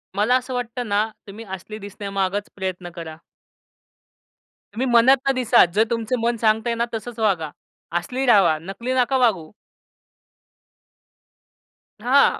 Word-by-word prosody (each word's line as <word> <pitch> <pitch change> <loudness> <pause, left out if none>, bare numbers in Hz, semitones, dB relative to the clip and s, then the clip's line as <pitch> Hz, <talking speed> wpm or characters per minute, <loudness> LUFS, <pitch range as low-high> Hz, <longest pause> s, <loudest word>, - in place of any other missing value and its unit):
मला 215 +5 +3
असं 255 0 -6
वाटतं 245 0 -4
ना 210 +2 +2 0.2
तुम्ही 210 +3 -9
असली 215 +3 -9
दिसण्यामागच 200 0 -3
प्रयत्न 185 -2 -4
करा. 165 -2 -7 1.6
तुम्ही 245 +5 -1
मनातनं 260 +3 +5
दिसा. 245 -1 +5
जर 215 - +5
तुमचं 230 +1 -1
मन 235 +1 0
सांगतंयना 230 +1 +1
तसंच 230 +1 -6
वागा. 185 -8 +1 0.5
असली 255 +9 -3
राहावा 195 -10 +5
नकली 215 +8 -4
नका 260 +1 +2
वागू. 200 -11 +1 2.5
हां. 260 +5 +4
225 Hz, 115 wpm, -22 LUFS, 195-245 Hz, 2.5 s, मनातनं